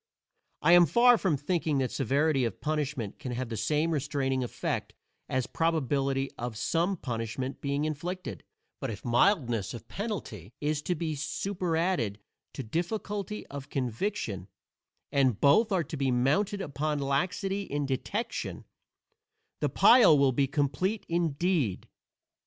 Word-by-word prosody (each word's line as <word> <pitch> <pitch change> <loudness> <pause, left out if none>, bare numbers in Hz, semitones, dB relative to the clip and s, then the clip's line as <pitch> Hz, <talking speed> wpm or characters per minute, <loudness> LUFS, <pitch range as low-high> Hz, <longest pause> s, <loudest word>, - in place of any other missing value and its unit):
I 160 - +5
am 175 -1 +8
far 240 - +6
from 170 -7 +1
thinking 155 0 0
that 130 -2 0
severity 140 +2 +1
of 115 -5 -2
punishment 145 -8 -2
can 125 -3 -5
have 125 0 -3
the 115 - -3
same 150 +9 +1
restraining 135 -3 0
effect 120 - -3 0.3
as 130 -1 0
probability 140 -4 0
of 120 -2 -4
some 175 - 0
punishment 120 0 -4
being 140 +1 -1
inflicted; 155 - -4 0.4
but - - -3
if 105 -2 -7
mildness 120 - +2
of 115 - -10
penalty 140 - -5
is 150 0 -1
to 180 - -1
be 160 -1 -2
superadded 165 - -1 0.4
to 135 - -5
difficulty 205 - -3
of 140 -1 -8
conviction, 125 - -2 0.6
and 130 -6 +2
both 210 +11 +5
are 185 -3 +2
to 155 - -6
be 135 -1 +1
mounted 150 +12 +1
upon 150 -2 -2
laxity 180 +8 -1
in 145 -6 -2
detection, 140 - -3 0.9
the - - +1
pile 235 -11 +7
will 140 -1 +4
be 135 +2 +1
complete 160 +10 -1
indeed. 165 - 0
145 Hz, 135 wpm, -29 LUFS, 130-175 Hz, 0.9 s, am